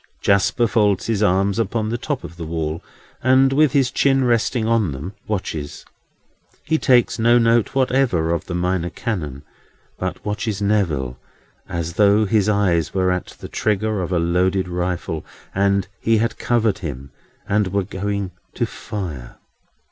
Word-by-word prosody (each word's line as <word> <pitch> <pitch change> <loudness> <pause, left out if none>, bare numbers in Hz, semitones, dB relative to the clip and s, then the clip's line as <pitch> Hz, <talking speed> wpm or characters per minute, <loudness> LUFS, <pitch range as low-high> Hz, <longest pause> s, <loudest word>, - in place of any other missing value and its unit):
Jasper 100 +4 +2
folds 105 -4 +2
his 110 -3 0
arms 100 +1 +2
upon 110 0 -1
the 120 - -1
top 145 0 -3
of 85 - -9
the 85 -1 -6
wall, 80 -1 -3 0.4
and, 130 +1 +4
with 150 -1 +4
his 135 -3 +3
chin 135 0 +3
resting 120 -1 +1
on 110 -9 +2
them, 75 +9 -6
watches. 85 -8 -4 0.8
He 160 0 +1
takes 125 -4 +3
no 120 +2 +5
note 115 +1 +2
whatever 125 -11 +2
of 85 - -1
the 90 - -4
Minor 90 0 0
Canon, 75 - -4 0.6
but 95 0 -4
watches 105 -1 -2
Neville, 85 -12 0 0.5
as 85 0 -3
though 105 +3 +4
his 105 0 +2
eye 100 -5 +3
were 95 -1 +1
at 90 0 -2
the - - -7
trigger 110 -1 0
of 90 - -4
a 90 - +2
loaded 90 +3 +1
rifle, 90 -3 -3 0.3
and 100 -1 +1
he 115 0 +2
had 115 +2 -1
covered 110 -4 +1
him, 70 -6 -6 0.4
and 105 -1 +2
were 100 +1 0
going 100 0 -3 0.2
to - - 0
fire. 80 -12 -6
100 Hz, 155 wpm, -21 LUFS, 90-115 Hz, 0.8 s, no